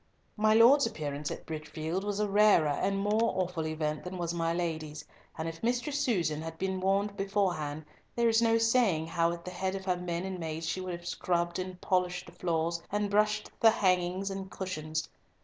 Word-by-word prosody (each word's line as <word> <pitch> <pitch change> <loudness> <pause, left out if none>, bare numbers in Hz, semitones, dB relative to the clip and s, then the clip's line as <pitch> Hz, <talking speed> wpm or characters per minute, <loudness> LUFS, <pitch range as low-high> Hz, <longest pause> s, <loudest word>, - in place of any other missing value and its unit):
My 215 0 +3
Lord's 245 +4 +7
appearance 150 -8 -4
at - - -7
Bridgefield 160 +3 -4
was 205 0 -2
a 210 - +1
rarer 205 -6 +5
and 195 +7 0
more 210 +3 +2
awful 180 -3 -1
event 155 -1 -2
than 180 +1 -6
was 170 -1 -2
my 165 -1 0
Lady's, 160 -3 -3 0.3
and 160 0 -3
if 165 0 -6
Mistress 250 +5 0
Susan 175 - 0
had 165 0 -6
been 190 +1 -2
warned 200 +2 +1
beforehand, 180 -7 -1 0.3
there 235 -1 +3
is 225 0 +4
no 230 -1 +4
saying 225 -8 +3
how 165 +1 +1
at 170 0 -7
the 180 - -5
head 190 +1 -2
of 190 -1 -6
her 180 -2 +1
men 175 -1 -3
and 190 -1 -4
maids 160 0 -4
she 185 - -2
would 185 -1 -4
have 170 0 -8
scrubbed 175 0 -1
and 185 0 -5
polished 180 -1 0
the - - -12
floors, 170 -1 -1
and 205 0 0
brushed 210 +1 +2
the 225 - +7
hangings 185 -1 +1
and 195 0 -5
cushions. 155 -5 -4
180 Hz, 200 wpm, -30 LUFS, 165-205 Hz, 0.3 s, Lord's